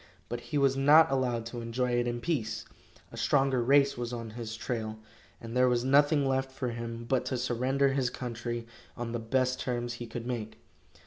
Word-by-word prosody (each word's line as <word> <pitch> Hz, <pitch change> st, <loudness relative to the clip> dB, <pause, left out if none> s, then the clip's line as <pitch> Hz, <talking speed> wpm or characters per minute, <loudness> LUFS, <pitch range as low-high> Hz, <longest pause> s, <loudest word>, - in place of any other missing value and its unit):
But 120 Hz, -, -3 dB
he 150 Hz, -, 0 dB
was 135 Hz, -1 st, +3 dB
not 145 Hz, +3 st, +6 dB
allowed 125 Hz, -4 st, 0 dB
to 120 Hz, +1 st, -6 dB
enjoy 125 Hz, +2 st, -1 dB
it 120 Hz, 0 st, +1 dB
in 120 Hz, 0 st, -2 dB
peace. 125 Hz, -10 st, -2 dB, 0.5 s
A -, -, -10 dB
stronger 135 Hz, -3 st, +2 dB
race 140 Hz, +1 st, +4 dB
was 120 Hz, 0 st, -3 dB
on 115 Hz, -2 st, -5 dB
his 115 Hz, 0 st, -6 dB
trail, 110 Hz, -2 st, -3 dB, 0.4 s
and 115 Hz, +1 st, -8 dB
there 125 Hz, 0 st, +5 dB
was 120 Hz, -1 st, +1 dB
nothing 145 Hz, +2 st, +4 dB
left 135 Hz, 0 st, 0 dB
for 130 Hz, -1 st, -3 dB
him 115 Hz, 0 st, -5 dB
but 130 Hz, 0 st, +1 dB
to 130 Hz, 0 st, -1 dB
surrender 130 Hz, +3 st, +1 dB
his 135 Hz, -2 st, +1 dB
country 120 Hz, -1 st, -4 dB, 0.3 s
on 120 Hz, -1 st, -4 dB
the 120 Hz, -, -2 dB
best 130 Hz, +3 st, 0 dB
terms 120 Hz, -1 st, -2 dB
he 120 Hz, 0 st, -7 dB
could 115 Hz, 0 st, -6 dB
make. 120 Hz, -3 st, -4 dB
125 Hz, 195 wpm, -30 LUFS, 115-135 Hz, 0.5 s, not